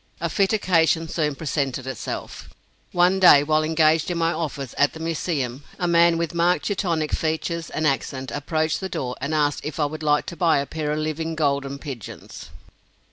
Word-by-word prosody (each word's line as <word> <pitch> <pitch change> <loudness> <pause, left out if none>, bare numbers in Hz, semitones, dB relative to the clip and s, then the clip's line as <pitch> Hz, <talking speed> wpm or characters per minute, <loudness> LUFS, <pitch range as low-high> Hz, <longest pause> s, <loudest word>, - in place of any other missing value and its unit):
A - - -2
fit 195 -2 +2
occasion 165 -6 +2
soon 150 -3 -1
presented 140 -4 -2
itself. 130 - -6 0.4
One 180 +2 +3
day, 160 -6 +8
while 155 +1 +2
engaged 160 0 +2
in 175 - -2
my 165 0 +1
office 145 -5 -4
at 145 0 +2
the 160 - -9
Museum, 145 -5 -2
a 175 - -1
man 170 0 +4
with 170 -1 -2
marked 170 +1 +2
Teutonic 170 -6 -1
features 165 +1 -2
and 155 - -2
accent 135 -2 -1
approached 155 +2 -1
the 190 - -4
door 125 -6 -3
and 155 +2 -1
asked 145 -1 +1
if 150 +1 -5
I 150 - +3
would 155 +2 -5
like 150 -1 +2
to - - -7
buy 165 -3 +3
a 140 - 0
pair 150 0 -3
of 150 - -1
living 155 +1 -3
golden 140 -2 0
pigeons. 135 -7 -9
155 Hz, 190 wpm, -23 LUFS, 145-170 Hz, 0.4 s, day